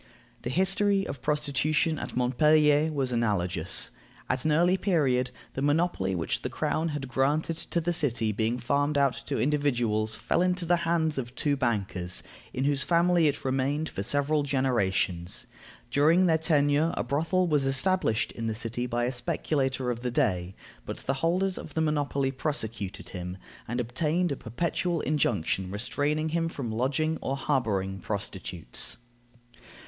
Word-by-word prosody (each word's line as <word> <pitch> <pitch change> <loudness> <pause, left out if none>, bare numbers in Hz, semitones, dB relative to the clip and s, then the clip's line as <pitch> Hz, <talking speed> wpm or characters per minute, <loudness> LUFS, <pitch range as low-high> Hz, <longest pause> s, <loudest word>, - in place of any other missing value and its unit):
The - - -4
history 195 +5 +2
of 135 - -6
prostitution 150 +2 +1
at - - -6
Montpellier 150 +4 +4
was 135 -4 -1
analogous. 95 -8 0 0.4
At 130 +2 0
an 155 - +3
early 175 +4 +4
period, 145 -10 +1 0.2
the 135 - -3
monopoly 145 - +1
which 85 -2 -1
the - - -3
crown 160 - -1
had 145 -3 -4
granted 145 +6 0
to 170 - +1
the 170 +1 0
city 120 -9 0
being 110 +3 0
farmed 140 +4 +1
out 140 -2 +3
to - - -1
individuals, 120 -7 +1
fell 170 - 0
into 180 -1 +1
the 175 +1 +3
hands 160 -4 +1
of 120 -1 -6
two 145 -1 +1
bankers, 100 -8 -1 0.3
in 130 - -2
whose 140 0 +1
family 170 0 +3
it 145 - -1
remained 135 +4 0
for - - -4
several 145 +7 +1
generations. 115 -10 0 0.5
During 160 +6 +4
their 160 -2 +3
tenure, 150 0 +2
a - - 0
brothel 165 +6 +1
was 145 -4 +2
established 135 - +1
in 115 -1 -4
the 110 - -1
city 115 +2 -3
by 120 0 -1
a 125 - 0
speculator 130 -2 -1
of 120 - -4
the 125 +1 -2
day, 95 - 0 0.3
but - - -6
the 135 - +1
holders 185 +3 +1
of 155 - -10
the 160 - +1
monopoly 145 -3 0
prosecuted 115 -9 -4
him, 90 0 -6 0.3
and 120 +2 -2
obtained 150 +8 0
a - - 0
perpetual 165 +7 -2
injunction 100 - 0
restraining 145 +9 -1
him 165 +1 0
from 135 -8 -4
lodging 145 +7 0
or 135 - -2
harboring 100 -9 0
prostitutes. 95 - -3
140 Hz, 155 wpm, -28 LUFS, 120-155 Hz, 0.5 s, Montpellier